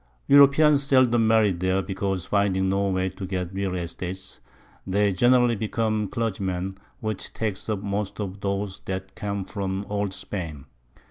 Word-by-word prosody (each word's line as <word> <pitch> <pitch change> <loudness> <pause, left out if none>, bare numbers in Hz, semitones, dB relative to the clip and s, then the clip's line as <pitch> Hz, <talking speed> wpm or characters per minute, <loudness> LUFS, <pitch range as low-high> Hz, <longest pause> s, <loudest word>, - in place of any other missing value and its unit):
Europeans 140 +1 +6
seldom 130 -4 +4
marry 110 -2 +4
there, 95 +2 0
because 95 -2 -2
finding 100 -2 +1
no 100 +1 +1
way 95 0 0
to 95 - -7
get 90 -1 -3
real 95 -1 -2
Estates, 90 +2 -5 0.5
they 100 +2 +2
generally 120 +3 +4
become 110 0 -1
Clergymen, 95 -4 -2 0.3
which 110 -3 -4
takes 110 -2 -3
up 105 -2 -2
most 100 0 -3
of 100 -1 -4
those 100 -1 -2
that 95 0 -5
come 100 -1 -3
from 95 -1 -3
Old 100 -1 -1
Spain. 80 -8 -6
100 Hz, 145 wpm, -25 LUFS, 95-110 Hz, 0.5 s, Europeans